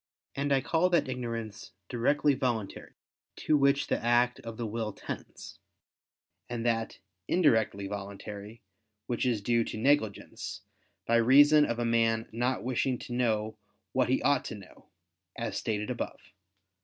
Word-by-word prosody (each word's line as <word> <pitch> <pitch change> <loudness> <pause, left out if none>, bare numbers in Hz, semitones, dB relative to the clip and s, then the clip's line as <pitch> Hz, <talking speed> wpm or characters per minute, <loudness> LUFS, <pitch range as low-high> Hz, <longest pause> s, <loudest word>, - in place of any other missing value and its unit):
And 140 +1 -1
I 135 -1 +4
call 165 +6 +2
that 170 -6 +2
ignorance 115 -4 -5
"directly" 145 +6 +2
voluntary, 120 -6 -3 0.4
to 155 - +1
which 140 0 +3
the - - -2
act 120 +1 +3
of 115 -1 -8
the 120 - -3
will 110 -1 -3
tends: - - -8 0.9
and 120 -1 -4
that, 115 -1 0 0.3
"indirectly" 110 - +2
voluntary, 100 +2 -7 0.4
which 120 +1 -1
is 115 -4 0
due 120 +1 +2
to - - -5
negligence, 110 -4 0 0.4
by 115 - +3
reason 145 +5 +6
of 120 - -2
a 120 - -1
man 115 -1 +2
not 120 +3 -1
wishing 130 +1 0
to 120 - -8
know 110 -3 0 0.3
what 130 -1 +1
he 130 - +1
ought 145 -2 +3
to - - -5
know, 100 -3 -15 0.5
as 115 - -3
stated 105 +1 -2
above 120 - -4
(Q. 100 -2 -23
120 Hz, 150 wpm, -29 LUFS, 110-130 Hz, 0.9 s, reason